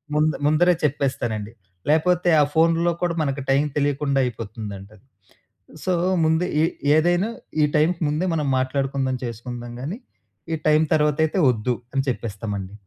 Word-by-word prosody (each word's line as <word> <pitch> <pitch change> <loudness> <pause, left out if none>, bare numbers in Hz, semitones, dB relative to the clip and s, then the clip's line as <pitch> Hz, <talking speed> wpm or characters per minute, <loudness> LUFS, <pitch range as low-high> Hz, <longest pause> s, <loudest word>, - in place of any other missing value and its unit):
ముందు 155 +1 +2
ముందరే 170 +4 +4
చెప్పేస్తానండి. 130 -7 -1 0.4
లేకపోతే 175 +3 +3
ఆ - - +6
ఫోన్‌లో 165 +1 +3
కూడా 175 -1 +1
మనకు 140 -1 -1
టైమ్ 140 +2 +3
తెలియకుండా 145 -1 +1
అయిపోతుందండి. 105 -3 -7 0.9
సో, 185 - +1 0.3
ముందే 160 +2 +2 0.2
ఎ - - +5 0.3
ఏదైనా 175 +6 +2 0.3
ఈ - - +6
టైమ్‌కి 165 +3 +1
ముందే 155 +5 -1
మనం 150 -3 -1
మాట్లాడుకుందాం, 135 0 -1
చేసుకుందాం 120 +1 -7
కానీ 170 - -5 0.5
ఈ - - 0
టైమ్ 155 +1 +4
తర్వాతైతే 155 +3 +1
వద్దు. 120 +1 0 0.2
అని 135 -1 +1
చెప్పేస్తామండి. 105 -4 -4
145 Hz, 130 wpm, -23 LUFS, 120-160 Hz, 0.9 s, ఆ